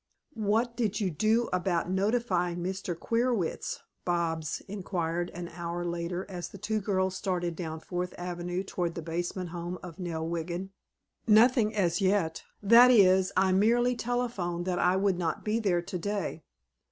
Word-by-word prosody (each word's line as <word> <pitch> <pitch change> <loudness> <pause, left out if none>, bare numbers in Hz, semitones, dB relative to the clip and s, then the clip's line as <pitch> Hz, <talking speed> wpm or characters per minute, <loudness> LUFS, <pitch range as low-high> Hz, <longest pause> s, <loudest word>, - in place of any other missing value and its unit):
"What 225 +2 0
did 215 -4 0
you 195 -4 0
do 220 +9 +2
about 180 -1 0
notifying 190 -3 +1
Mr. 185 -1 -3
Queerwitz?" 230 -6 -1 0.2
Bobs 165 -3 -1
inquired 175 -3 -2
an 175 0 -5
hour 175 0 -4
later 175 +2 -3
as 175 -3 -6
the - - -10
two 215 +2 -1
girls 190 -2 0
started 180 -3 -2
down 160 -2 -5
Fourth 180 +1 -4
Avenue 175 +1 -3
toward 175 -3 -3
the 170 - -5
basement 175 +2 -3
home 175 +1 -5
of 175 -1 -9
Nell 165 -3 -3
Wiggin. 170 +3 -3 0.6
"Nothing 220 0 +5
as 175 -3 +1
yet. 185 -4 +1 0.2
That 235 +4 +8
is, 190 -5 +5
I 190 0 +4
merely 240 +6 +3
telephoned 230 -9 -2
that 180 -1 -1
I 180 +1 +3
would 190 -2 +1
not 165 -3 -2
be 215 +2 +1
there 180 -6 +1
today. 195 -2 -3
185 Hz, 155 wpm, -29 LUFS, 175-210 Hz, 0.6 s, That